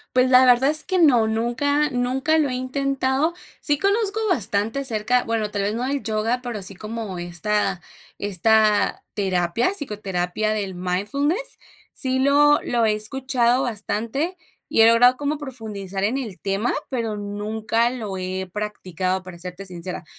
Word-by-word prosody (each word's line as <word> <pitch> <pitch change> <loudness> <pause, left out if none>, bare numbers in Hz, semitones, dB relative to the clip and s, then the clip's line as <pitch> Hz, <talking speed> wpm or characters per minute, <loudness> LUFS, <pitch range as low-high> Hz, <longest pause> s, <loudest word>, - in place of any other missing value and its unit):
Pues, 255 0 +4
la 255 0 +7
verdad 250 +2 +5
es 310 0 +5
que 370 0 0
no. 255 -9 +5
Nunca 255 +7 +1
nunca 265 +4 +1
lo 300 -3 +2
he - - -3
intentado. 270 +3 0 0.3
Sí 290 -1 +1
conozco 400 +2 +1
bastante 220 - 0
acerca 245 -1 0
bueno, 220 -2 -2
tal 205 - -2
vez 200 +1 0
no 240 +3 -2
del 280 0 -2
yoga, 225 +3 -1
pero 235 -4 -4
sí 195 +1 -4
como 215 -1 -6
esta 185 +2 -1 0.4
esta 210 +2 +2
terapia, 190 - 0
psicoterapia 210 - -2
del 200 -3 -3
mindfulness. 280 - -1 0.4
Sí 260 -1 0
lo 290 +2 +5
lo 235 -2 +1
he 215 - +3
escuchado 245 +3 +1
bastante, 235 - -2 0.3
y - - +3
he 225 - +8
logrado 245 +2 +6
como 290 +3 -2
profundizar 215 -8 -6
en 225 +6 +1
el 225 -9 -6
tema, 200 +4 0 0.2
pero 230 -5 -2
nunca 215 +3 -1
lo 220 -6 -5
he 185 0 -4
practicado, 185 -3 -3
para 180 -2 -10
serte 180 +2 -7
sincera. 180 -1 -5
225 Hz, 155 wpm, -22 LUFS, 200-265 Hz, 0.4 s, he